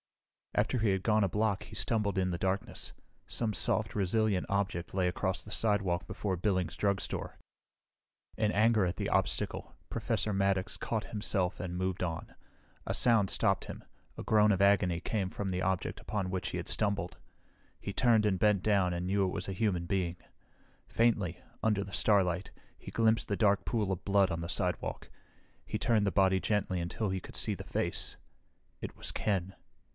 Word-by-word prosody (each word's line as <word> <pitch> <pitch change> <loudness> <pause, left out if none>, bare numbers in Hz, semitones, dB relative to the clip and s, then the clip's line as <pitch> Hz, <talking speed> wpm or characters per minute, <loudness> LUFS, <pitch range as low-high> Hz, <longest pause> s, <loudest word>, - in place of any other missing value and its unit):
After 125 - +1
he 110 -1 +2
had 95 -1 0
gone 110 -1 +3
a 100 - +2
block 105 0 0
he - - -11
stumbled 105 -4 0
in 95 -1 +1
the 85 - -2
darkness. 95 +2 -2 0.4
Some 110 -3 -1
soft, 110 +2 +1
resilient 105 0 +1
object 100 -3 -1
lay 95 -2 +2
across 95 +1 -1
the 105 - -10
sidewalk 95 -6 0
before 95 0 -2
Billings 90 -1 0
Drugstore. 100 -2 -2 1.0
In 110 -1 +1
anger 110 0 +4
at 90 -1 -2
the - - -2
obstacle, - - 0
Professor 105 - -1
Maddox 95 -1 +1
caught 110 -2 -2
himself 100 -4 -1
and 90 -2 -4
moved 95 0 -1
on. 85 -3 -4 0.5
A - - -1
sound 115 -5 +4
stopped 100 -4 +2
him. - - -8 0.3
A - - -5
groan 105 -1 +4
of 95 -1 +1
agony 100 -4 +4
came 95 +1 -2
from 95 0 -3
the 90 0 -1
object 95 -1 -1
upon 95 -3 -2
which 95 -1 -2
he - - -4
had - - -5
stumbled. 100 -4 0 0.6
He 100 - -5
turned 115 -1 +4
and 100 -3 +2
bent 105 -2 +3
down 100 -4 +3
and 85 +1 -3
knew 100 +1 +2
it 90 - -1
was - - -4
a 95 - -3
human 90 -3 0
being. 90 -1 -1 0.7
Faintly, 105 -7 +1 0.2
under 105 -3 +2
the 100 0 -10
starlight, 95 -4 +2 0.3
he - - -10
glimpsed 115 0 +2
the 100 - 0
dark 100 -2 +3
pool 105 -5 0
of 95 - -3
blood 100 -1 +3
on 85 0 -2
the 85 - -5
sidewalk. - - -2 0.5
He - - -3
turned 110 -3 +2
the - - +2
body 95 -1 +3
gently 100 -4 0
until 95 +5 -2
he 95 -1 -2
could - - -7
see - - +1
the - - -6
face. - - -2 0.6
It - - -6
was - - -2
Ken. 95 -2 -1
100 Hz, 180 wpm, -31 LUFS, 90-105 Hz, 1.0 s, anger